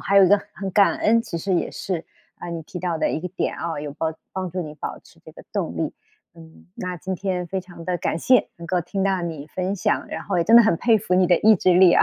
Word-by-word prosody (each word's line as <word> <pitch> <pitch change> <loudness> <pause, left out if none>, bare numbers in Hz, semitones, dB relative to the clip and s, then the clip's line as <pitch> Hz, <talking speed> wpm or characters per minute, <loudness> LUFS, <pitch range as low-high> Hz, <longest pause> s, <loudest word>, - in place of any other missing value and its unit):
还 195 +3 +1
有 195 - +9
一 - - +4
个 205 - +6 0.2
很 195 -1 -4
感 200 +1 +4
恩， 230 +2 +3
其 170 - -5
实 190 +3 -2
也 175 - 0
是， 175 -4 -4 0.3
啊， - - -8
你 165 -1 -5
提 180 - -8
到 175 -2 -2
的 - - 0
一 155 - -2
个 180 - -4
点 185 - -2
啊， 165 -3 -3
有 145 -1 -5
帮 160 +2 -2 0.2
帮 185 -1 -3
助 180 +1 -3
你 150 -1 -7
保 - - -6
持 - - -22
这 - - -12
个 - - -14
动 - - -2
力。 - - -2 0.4
嗯， 80 0 -16
那 180 -1 -4
今 190 +3 -4
天 185 -1 -2
非 190 +1 -3
常 175 -2 -12
地 180 -1 -1
感 160 - -1
谢 255 +8 +3
能 170 0 -9
够 180 0 0
听 190 +3 -3
到 190 -2 +1
你 160 -4 -5
分 185 +2 -2
享， 210 +2 0
然 - - -5
后 195 -3 -1
也 170 - +2
真 230 +2 +7
的 235 - +10
很 220 -5 +3
佩 230 +4 +3
服 200 -3 -3
你 185 0 +4
的 175 -1 +4
意 220 0 +6
志 180 0 +3
力 180 -1 +7
啊， - - +5
180 Hz, 305 characters per minute, -23 LUFS, 170-195 Hz, 0.4 s, 的